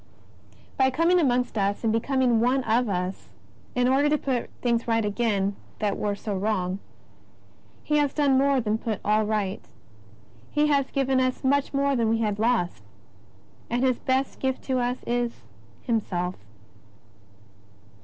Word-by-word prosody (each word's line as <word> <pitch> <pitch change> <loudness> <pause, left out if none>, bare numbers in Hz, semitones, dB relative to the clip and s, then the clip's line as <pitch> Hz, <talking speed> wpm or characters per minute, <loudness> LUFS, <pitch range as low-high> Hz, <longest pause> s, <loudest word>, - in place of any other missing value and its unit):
By 265 0 +4
coming 335 +6 +3
amongst 250 -6 +1
us 200 +2 0
and 220 -1 +2
becoming 245 0 +2
one 250 +3 +2
of 230 0 +1
us, 180 0 -3 0.5
in 250 0 +2
order 275 +3 +3
to 300 - +3
put 260 -4 -2 0.4
right 225 -1 +1
again 205 -2 0 0.2
what 205 -2 0
was 205 -1 -2
so 210 -3 -3
wrong. 190 -2 -1 1.0
He 300 - +1
has 290 -2 +2
done 285 -3 +2
more 275 0 +3
than 220 -2 -1
put 220 -3 -3
all 215 +1 +3
right. 210 -2 -1 0.9
He 300 0 +2
has 280 -2 +2
given 270 -1 +1
us 255 0 0
much 280 +1 +2
more 280 0 +1
than 230 -3 +1
we 225 - +2
had 210 -2 -1
lost. 215 - +1 0.9
And 240 +2 0
His 255 -2 +2
best 260 +1 -1
gift 265 -1 -2
to 260 -1 0
us 245 +1 -2
is 240 0 -2 0.2
— 110 -2 -28
Himself. 185 -6 -1
240 Hz, 155 wpm, -25 LUFS, 210-265 Hz, 1.0 s, By